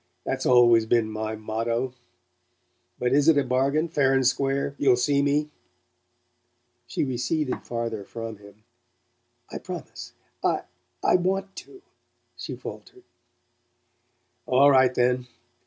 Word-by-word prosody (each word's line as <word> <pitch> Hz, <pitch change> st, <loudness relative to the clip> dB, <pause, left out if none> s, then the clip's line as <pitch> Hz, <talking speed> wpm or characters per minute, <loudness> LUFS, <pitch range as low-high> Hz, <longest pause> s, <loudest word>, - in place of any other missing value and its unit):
That's 130 Hz, 0 st, -2 dB
always 120 Hz, -3 st, +5 dB
been 110 Hz, -2 st, +2 dB
my 110 Hz, 0 st, -4 dB
motto. 115 Hz, +3 st, -2 dB, 1.0 s
But 125 Hz, 0 st, -1 dB
is 145 Hz, +2 st, +3 dB
it 160 Hz, -3 st, +6 dB
a 140 Hz, -, +3 dB
bargain 135 Hz, +5 st, +1 dB
fair 140 Hz, -5 st, +2 dB
and 130 Hz, -1 st, +2 dB
square? 135 Hz, +2 st, 0 dB
You'll 140 Hz, -3 st, +4 dB
see 140 Hz, +3 st, +1 dB
me?" 145 Hz, +2 st, 0 dB, 1.4 s
She -, -, -2 dB
receded 130 Hz, +2 st, -2 dB
farther 115 Hz, -3 st, -3 dB
from 115 Hz, +1 st, -7 dB
him. 100 Hz, +1 st, -17 dB, 0.9 s
"I -, -, -5 dB
promise. -, -, -8 dB, 0.3 s
I -, -, +1 dB, 0.4 s
I -, -, +4 dB
WANT 190 Hz, +2 st, -2 dB
to," 385 Hz, -1 st, -12 dB, 0.5 s
she -, -, -6 dB
faltered. 375 Hz, -1 st, -10 dB, 1.4 s
"All 140 Hz, +3 st, +5 dB
right, 130 Hz, -2 st, +5 dB
then. 125 Hz, 0 st, +1 dB
130 Hz, 125 wpm, -25 LUFS, 115-145 Hz, 1.4 s, it